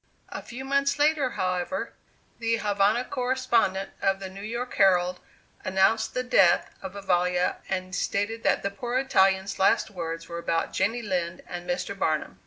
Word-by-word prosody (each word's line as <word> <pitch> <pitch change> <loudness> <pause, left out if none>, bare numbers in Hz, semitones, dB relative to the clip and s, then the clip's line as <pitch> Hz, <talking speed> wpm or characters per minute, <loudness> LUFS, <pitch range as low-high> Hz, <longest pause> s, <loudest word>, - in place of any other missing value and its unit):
A - - -6
few 260 +3 -8
months 280 +1 +1
later, 295 -2 +3
however, 185 +7 -2 0.5
the 230 -1 +1
Havana 210 +2 +1
correspondent 245 -7 0
of 195 0 +1
the 190 -1 -7
New 195 +1 -9
York 235 +4 -4
Herald 180 -2 +3 0.4
announced 190 +4 +2
the 255 - 0
death 195 -8 +4
of 190 -1 -7
Vivalla 180 -2 +1
and 185 -1 -3
stated 205 +3 -1
that - - +1
the 200 - -1
poor 240 +5 -3
Italian's 195 -7 +2
last 195 +3 +3
words 165 -3 -5
were 170 0 -5
about 165 -1 -1
Jenny 235 +3 0
Lind 180 -4 -2
and 175 -1 -7
Mr. 265 -6 -2
Barnum. 155 - -1
195 Hz, 160 wpm, -26 LUFS, 185-240 Hz, 0.5 s, death